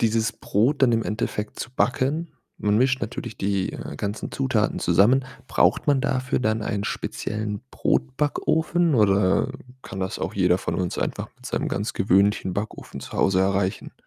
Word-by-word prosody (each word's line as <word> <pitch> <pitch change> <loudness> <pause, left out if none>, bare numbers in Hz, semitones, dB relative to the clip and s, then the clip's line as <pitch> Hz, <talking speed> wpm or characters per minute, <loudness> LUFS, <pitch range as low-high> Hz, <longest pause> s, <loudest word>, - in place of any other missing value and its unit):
Dieses 115 0 +2
Brot 125 +8 +1
dann 125 -3 +6
im 115 0 +2
Endeffekt 105 0 -3
zu 120 - -5
backen. 145 +6 0 0.3
Man 105 0 +2
mischt 130 +1 +2
natürlich 110 +1 -5
die, 100 -1 -1
äh, - - -7
ganzen 105 +1 -4
Zutaten 65 - 0
zusammen. 125 +7 +4 0.2
Braucht - - +2
man 140 -3 +3
dafür 130 -2 0
dann 110 -2 0
einen 100 -1 -2
speziellen 105 -1 -3
Brotbackofen 155 +4 +1
oder 100 +1 +3 0.3
kann 95 - -7
das 95 +3 -3
auch - - -3
jeder 90 -2 +3
von - - -3
uns 90 -1 -2
einfach - - -2
mit - - -11
seinem - - -1
ganz 105 +3 -2
gewöhnlichen 95 0 +2
Backofen 105 +2 -5
zu - - -9
Hause 95 -1 +2
erreichen? 95 0 0
110 Hz, 160 wpm, -24 LUFS, 100-130 Hz, 0.3 s, dann